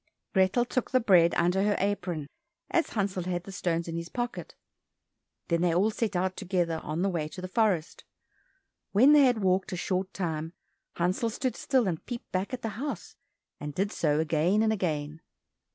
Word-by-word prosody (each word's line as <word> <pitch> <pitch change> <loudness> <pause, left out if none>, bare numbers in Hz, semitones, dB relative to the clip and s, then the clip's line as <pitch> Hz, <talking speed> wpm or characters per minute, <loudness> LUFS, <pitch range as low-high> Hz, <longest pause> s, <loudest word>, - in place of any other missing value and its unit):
Grethel 190 +5 +3
took 255 0 -2
the 255 - +3
bread 180 -7 +5
under 175 +3 +2
her 205 0 +2
apron, 180 -6 -1 0.5
as 335 - +2
Hansel 195 -4 -2
had 175 -1 -2
the 195 - -9
stones 170 -2 -1
in 165 - -4
his 170 0 -5
pocket. 240 -1 -4 0.9
Then 170 -1 +1
they 175 -2 +2
all 200 +5 +3
set 215 -2 -2
out 185 +1 0
together 175 -3 -1
on 155 +4 -2
the 195 - +2
way 165 -5 -2
to 155 - -9
the 185 - -5
forest. 185 -5 0 0.9
When 255 +9 +7
they 290 -2 +7
had 245 -5 +2
walked 185 0 +1
a - - -2
short 185 +2 -1
time, 165 -3 -3 0.4
Hansel 185 +7 0
stood 250 +3 -2
still 260 -6 +1
and 165 -4 -2
peeped 240 -1 -7
back 190 +2 -1
at 255 -1 -5
the 225 - -1
house, 290 0 -5 0.4
and 145 -1 -6
did 200 +2 0
so 150 -6 +1
again 160 +6 +2
and 220 0 +3
again. 155 -5 -2
185 Hz, 185 wpm, -28 LUFS, 170-215 Hz, 0.9 s, When